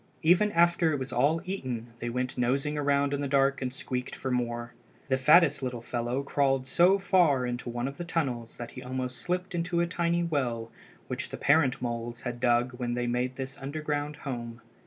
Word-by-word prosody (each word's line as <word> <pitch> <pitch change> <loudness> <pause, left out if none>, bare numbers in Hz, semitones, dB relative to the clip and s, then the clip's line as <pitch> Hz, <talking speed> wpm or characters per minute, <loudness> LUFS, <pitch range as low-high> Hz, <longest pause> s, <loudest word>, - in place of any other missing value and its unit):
Even 180 +6 +4
after 170 -1 +4
it 145 - 0
was 130 0 -5
all 150 +7 +2
eaten 125 -11 -4
they 120 - -3
went 125 +1 -2
nosing 135 +5 0
around 145 -1 +1
in 145 - -1
the 140 - -1
dark 135 0 +2
and 130 -1 -2
squeaked 125 -1 -4
for 130 - -4
more. 120 -1 -2 0.4
The 130 - +3
fattest 150 +1 +5
little 125 -3 -4
fellow 120 +3 -2
crawled 135 -2 +1
so 175 +9 +4
far 175 -9 +3
into 120 0 -4
one 120 +1 -2
of 140 +1 -7
the - - -4
tunnels 130 -10 -2
that 120 -1 -6
he 125 - -9
almost 125 0 -4
slipped 180 +1 -2
into 170 0 -1
the 170 - +3
tiny 170 0 0
well 125 -8 -1 0.4
which - - -3
the - - -6
parent 140 -3 +3
moles 120 0 -4
had 120 -1 -4
dug 120 +1 +2
when 120 -1 -1
they 120 0 -1
made 125 +1 -1
this 135 +1 -6
underground 150 +1 -3
home. 120 -3 -5
135 Hz, 200 wpm, -29 LUFS, 120-155 Hz, 0.4 s, fattest